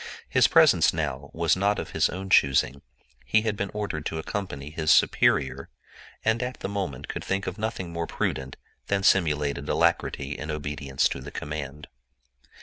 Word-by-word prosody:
His -, -, +4 dB
presence -, -, +5 dB
now 70 Hz, +2 st, -3 dB
was 85 Hz, 0 st, +2 dB
not 100 Hz, +2 st, +1 dB
of -, -, -5 dB
his -, -, +2 dB
own 95 Hz, +2 st, -6 dB
choosing: 70 Hz, 0 st, +3 dB, 0.4 s
he 110 Hz, +12 st, +2 dB
had 110 Hz, -2 st, -1 dB
been 100 Hz, -1 st, -3 dB
ordered 100 Hz, -8 st, -3 dB
to 80 Hz, -, -4 dB
accompany 80 Hz, -5 st, -5 dB
his 80 Hz, -1 st, -2 dB
superior, 70 Hz, 0 st, +3 dB, 0.6 s
and 110 Hz, +1 st, +2 dB
at 125 Hz, 0 st, -4 dB
the -, -, -2 dB
moment 95 Hz, -10 st, -4 dB
could -, -, -5 dB
think 100 Hz, +1 st, -2 dB
of 95 Hz, +3 st, -5 dB
nothing 100 Hz, -6 st, -3 dB
more 85 Hz, 0 st, -3 dB
prudent 65 Hz, 0 st, -3 dB, 0.3 s
than 100 Hz, -1 st, 0 dB
simulated 75 Hz, -6 st, +2 dB
alacrity 70 Hz, 0 st, +1 dB
in 75 Hz, -, -6 dB
obedience 75 Hz, -3 st, -1 dB
to 70 Hz, -, -5 dB
the -, -, -8 dB
command. 75 Hz, -1 st, -6 dB
80 Hz, 165 wpm, -26 LUFS, 70-100 Hz, 0.6 s, presence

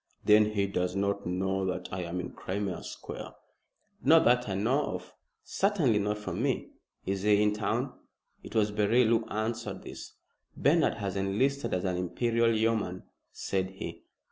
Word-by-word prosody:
"Then 105 Hz, 0 st, +7 dB
he 100 Hz, -1 st, +2 dB
does 90 Hz, -2 st, -1 dB
not 100 Hz, -1 st, -1 dB
know 95 Hz, +2 st, 0 dB
that 90 Hz, 0 st, -3 dB
I 90 Hz, -, -3 dB
am 85 Hz, +1 st, -3 dB
in -, -, -5 dB
Crimea 95 Hz, 0 st, -3 dB
Square." -, -, -8 dB, 0.7 s
"Not -, -, +6 dB
that 125 Hz, -1 st, +3 dB
I 95 Hz, -, -1 dB
know 125 Hz, +8 st, +1 dB
of. 90 Hz, 0 st, -9 dB, 0.3 s
Certainly 170 Hz, -, +2 dB
not 105 Hz, +1 st, 0 dB
from 100 Hz, -1 st, -4 dB
me. 135 Hz, -1 st, -1 dB, 0.3 s
Is 95 Hz, 0 st, -1 dB
he 105 Hz, 0 st, +4 dB
in 105 Hz, 0 st, +3 dB
town?" 105 Hz, -1 st, -1 dB, 0.5 s
It -, -, -11 dB
was 105 Hz, -1 st, +3 dB
Beryl 105 Hz, +4 st, +3 dB
who 115 Hz, -1 st, +2 dB
answered 110 Hz, -2 st, -3 dB
this. -, -, -9 dB, 0.4 s
"Bernard -, -, +3 dB
has 100 Hz, -4 st, -3 dB
enlisted 105 Hz, +9 st, 0 dB
as 90 Hz, -, -2 dB
an 90 Hz, -1 st, 0 dB
Imperial 115 Hz, +6 st, +1 dB
Yeoman," 110 Hz, -5 st, 0 dB, 0.3 s
said 95 Hz, -1 st, -2 dB
he. 95 Hz, 0 st, -7 dB
105 Hz, 165 wpm, -29 LUFS, 95-115 Hz, 0.7 s, Then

